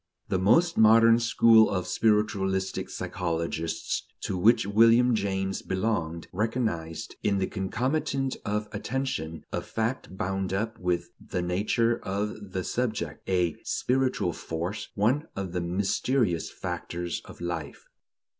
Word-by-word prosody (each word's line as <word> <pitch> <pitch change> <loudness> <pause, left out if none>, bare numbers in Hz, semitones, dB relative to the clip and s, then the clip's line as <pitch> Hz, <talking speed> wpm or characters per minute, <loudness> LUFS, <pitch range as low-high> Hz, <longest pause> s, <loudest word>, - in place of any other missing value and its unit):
The 95 - +1
most 165 - +4
modern 115 +1 +7
school 115 -1 +5
of 90 -2 -1
spiritualistic 100 -3 +1
psychologists, 85 0 -3
to - - -2
which 105 +3 +4
William 115 +4 +5
James 95 -2 -1
belonged, 95 -5 -2
recognized, 100 -6 -2
in 100 -1 +1
the 95 - +1
concomitant 130 +8 -1
of 105 +1 -2
attention, 105 - -3
a - - -1
fact 110 -4 -3
bound 95 0 -2
up 110 +3 -2
with 90 -1 -1
the 90 - -3
nature 110 +6 +1
of 100 0 -4
the 95 - -1
subject, 110 -12 -3
a 90 -3 +1
"spiritual 130 -8 0
force," 85 +6 -4
one 130 +10 +1
of 95 -2 -4
the 90 0 -2
"mysterious 95 +2 0
factors 85 0 -4
of - - -12
life." 85 -4 -5
100 Hz, 125 wpm, -27 LUFS, 90-115 Hz, -, modern